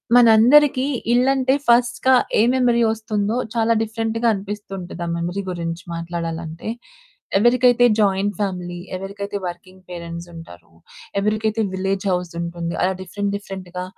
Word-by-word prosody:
మనందరికీ 250 +4 +6 0.3
ఇల్లంటే 260 +1 +3
ఫర్స్ట్‌గా 240 +2 +3 0.2
ఏ - - +4
మెమరీ 245 -2 +2
వొస్తుందో, 215 -1 -1 0.2
చాలా 230 0 +2
డిఫరెంట్‌గా 225 +1 -1
అనిపిస్తుంటది, 195 -3 -6
ఆ - - -5
మెమరీ 175 +4 -3
గురించి 170 0 -4
మాట్లాడాలంటే. 165 +1 -5 0.7
ఎవరికైతే 245 +2 +4
జాయింట్ 200 0 +2
ఫ్యామిలీ, 180 -3 -3 0.2
ఎవరికైతే 200 +2 -5
వర్కింగ్ 185 +1 -8
పేరెంట్స్ 170 -1 -7
ఉంటారో, 165 - -13 0.5
ఎవరికైతే 215 +2 0
విలేజ్ 195 +1 -2
హౌస్ 180 -1 -2
ఉంటుంది, 170 0 -4
అలా 190 +1 +2
డిఫరెంట్, 200 +2 -3
డిఫరెంట్‌గా 185 -2 -7
200 Hz, 115 wpm, -21 LUFS, 175-225 Hz, 0.7 s, మనందరికీ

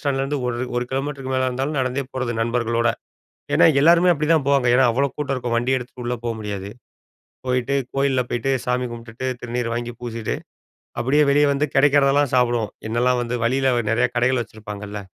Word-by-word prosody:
ஸ்டாண்ட்லேருந்து 140 0 -1
ஒரு 120 -1 -2 0.2
1 125 - 0
கிலோமீட்டருக்கு 135 0 -3
மேல 130 0 +1
இருந்தாலும் 135 +4 -2
நடந்தே 130 +2 -1
போறது. 130 -2 -2
நண்பர்களோட. 115 0 0 0.7
ஏன்னா? - - +6 0.2
எல்லாருமே 170 +3 +6
அப்படிதான் 155 -1 +1
போவாங்க! 140 -3 +3
ஏன்னா? 130 - +5
அவ்ளோ 140 +3 +1
கூட்டம் 140 -2 -2
இருக்கும். 120 -2 -2
வண்டி 125 +3 +1
எடுத்துட்டு 125 0 -9
உள்ள 125 - -1
போ 120 - -1
முடியாது. 100 -2 -5 0.8
போயிட்டு 125 +2 0 0.2
கோயில்ல 135 -2 +2
போய்ட்டு 120 +3 -1 0.2
சாமி 125 0 0
கும்டுட்டு, 115 +2 -7 0.2
திருநீர 120 -1 -2
வாங்கி 120 0 -4
பூசிட்டு, 115 -2 -4 0.6
அப்படியே 145 +5 +3
வெளியே 145 +1 +4
வந்து 150 +2 0
கிடைக்கிறதெல்லாம் 140 -1 +4
சாப்பிடுவோம். 120 -4 +1 0.2
என்னெல்லாம் 125 +2 +1
வந்து 120 +1 -3
வழியில 130 +2 +2 0.2
நிறைய 115 - +2
கடைகள் 120 0 +2
வச்சிருப்பாங்கல்ல! 105 -1 -8
125 Hz, 165 wpm, -22 LUFS, 120-140 Hz, 0.8 s, ஏன்னா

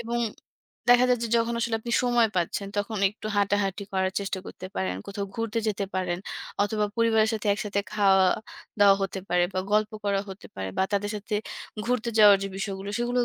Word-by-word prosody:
এবং 235 +1 -2 0.7
দেখা 245 +1 +7
যায় 250 -1 +3
যে - - -2
যখন 230 0 +1
আসলে 230 -1 0
আপনি 235 +1 -5
সময় 240 -2 +3
পাচ্ছেন 180 +3 -1
তখন 205 +1 -1
একটু 210 +1 -9
হাঁটাহাঁটি 200 0 +1
করার 190 0 0
চেষ্টা 195 -1 -3
করতে 185 - -8
পারেন, 95 -1 -1
কোথাও 200 0 -4
ঘুরতে 230 0 -2
যেতে 205 -1 -1
পারেন 180 -2 -1 0.4
অথবা 210 0 0
পরিবারের 225 -1 +3
সাথে 215 -1 -4
একসাথে 205 -1 -2
খাওয়া-দাওয়া 200 0 +3
হতে 195 0 -3
পারে 175 0 +3
বা - - 0
গল্প 215 0 +3
করা 200 -1 +1
হতে 190 0 -9
পারে 95 0 -3
বা - - +4
তাদের 205 +1 0
সাথে 210 +1 -5 0.5
ঘুরতে 240 -1 0
যাওয়ার 205 -2 +9
যে 195 - -2
বিষয়গুলো 195 0 -4
সেগুলোও 245 +1 +1
205 Hz, 180 wpm, -26 LUFS, 195-225 Hz, 0.7 s, যাওয়ার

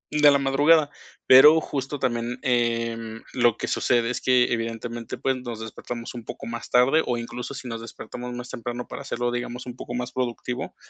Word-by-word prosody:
de 150 -1 +7
la 140 - +5
madrugada, 145 +2 +4 0.4
pero 150 +5 +9
justo 140 0 -4
también, 120 -1 -1
em, 115 -2 -1
lo 120 -3 +3
que - - -3
sucede 120 -1 +1
es - - -3
que, 125 -2 +3
evidentemente, 115 0 -4
pues, 135 -1 0
nos 120 -3 -6
despertamos 115 +2 -7
un 120 -2 -7
poco - - -7
más 115 0 -6
tarde 130 +6 +4
o 120 -1 0
incluso 125 +3 -6
si 135 -3 -7
nos 115 -1 -5
despertamos 120 +2 -8
más 125 0 -6
temprano 120 +1 -5
para - - -7
hacerlo, 120 -3 -2
digamos, 120 0 -4
un 125 -1 -7
poco 120 -1 -7
más 125 0 -3
productivo, 125 +1 -3
120 Hz, 185 wpm, -25 LUFS, 115-130 Hz, 0.4 s, pero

